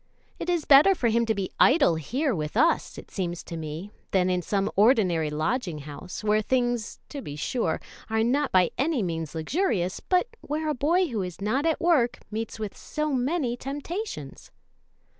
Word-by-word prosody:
It - - -4
is 345 -3 +1
better 295 +8 +7
for 245 -8 +1
him 230 +1 +2
to 220 - +1
be 195 -2 -3
idle 275 - +5
here 250 - -1
with 155 +2 -3
us, 330 +6 +2
it - - -11
seems 175 -3 -3
to 170 - -7
me, 160 +5 -6 0.2
than 185 -1 +2
in 180 0 +1
some 200 +3 -1
ordinary 190 - +3
lodging 165 - -1
house, 150 +7 -8
where 215 0 +3
things, 240 -1 -1
to 285 - -6
be 145 - -7
sure, 160 - -1 0.3
are 220 0 +2
not 275 +5 +1
by 185 -2 +4
any 275 -4 +1
means 165 -3 -3
luxurious, 185 - 0
but 365 +5 +1
where 310 +1 -2
a - - +1
boy 330 +7 +2
who 220 -4 -2
is 180 -2 -6
not 250 +10 0
at 320 - +1
work 290 -9 +3
meets 220 +1 -4
with 215 -2 -5
so 305 -1 -3
many 260 -1 0
temptations." 290 - -6
225 Hz, 180 wpm, -26 LUFS, 180-290 Hz, 0.3 s, better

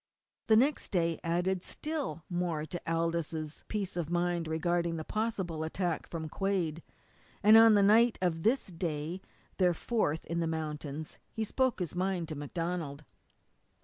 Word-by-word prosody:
The 220 - +6
next 270 +6 +2
day 170 -4 +1
added 175 +2 0
still 300 - -4
more 175 -4 -1
to 175 +3 -6
Aldous' 165 -2 -2
peace 200 -5 -3
of 170 -3 -2
mind 175 -1 0
regarding 170 +1 0
possible 190 -6 -2
attack 170 +1 -2
from 160 -2 -5
Quade, 170 -2 -1 0.6
and 215 +2 +8
on 225 -1 +9
the 200 - +5
night 225 +3 +5
of 175 -3 0
this 240 +9 +2
day, 165 -1 -3 0.4
their 180 -3 +3
fourth 160 -7 -1
in 170 0 -2
the 165 - 0
mountains, 155 -1 -4
he 220 - -2
spoke 260 +3 +1
his 180 -3 -3
mind 180 -2 -1
to 155 - -4
MacDonald. 155 -1 -4
175 Hz, 150 wpm, -31 LUFS, 160-195 Hz, 0.6 s, on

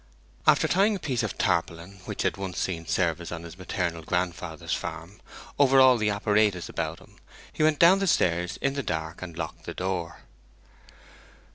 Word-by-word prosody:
After - - +5
tying 200 +4 +3
a - - -5
piece 130 -7 -1
of 110 - -4
tarpaulin, 85 +3 -1
which - - -3
had - - +1
once 95 -2 -5
seen 85 -3 -3
service 85 -1 -1
on 85 -1 -6
his 85 +1 -10
maternal 90 -2 -3
grandfather's 90 +1 -3
farm, 90 +6 -6 0.4
over 135 -1 +6
all 130 -1 +7
the 110 0 +1
apparatus 105 -2 +1
around - - -3
him, - - -19 0.4
he - - -4
went 155 -1 +4
down 180 +5 +6
the 195 - 0
stairs 90 - +1
in 135 - +1
the 140 - -2
dark, 80 -7 -4
and 85 -3 -8
locked 80 -2 -6
the - - -6
door. 90 -2 -3
95 Hz, 175 wpm, -26 LUFS, 85-130 Hz, 0.4 s, all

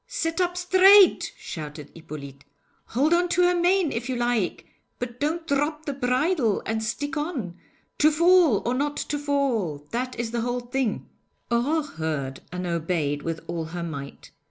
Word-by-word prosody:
'Sit 330 +2 -2
up 355 0 0
straight,' 375 +2 +6
shouted 150 -2 -8
Hippolyte. 140 -4 -10 0.4
'Hold 285 +8 +1
on 350 +1 +2
to 360 +1 +3
her 355 0 +4
mane 355 -2 +2
if 240 +3 -4
you 255 - -1
like, 240 -5 -1 0.3
but 245 0 -6
don't 320 +3 -1
drop 300 +1 -1
the 285 - -2
bridle, 255 - +1
and 220 0 -1
stick 270 +6 -3
on. 285 - -3 0.4
To 305 - +6
fall 335 - +4
or 240 - +1
not 290 +3 -1
to 290 - -2
fall 245 - -1
that 250 +1 -3
is 235 -1 -2
the 235 -1 -1
whole 245 +1 -2
thing.' 245 -2 -2 0.4
Aurore 285 +7 +1
heard 155 - -4
and 180 0 -4
obeyed 165 -4 -1
with 165 +1 -4
all 170 -1 -4
her 170 +2 -5
might. 140 -4 -7
245 Hz, 165 wpm, -25 LUFS, -, 0.4 s, straight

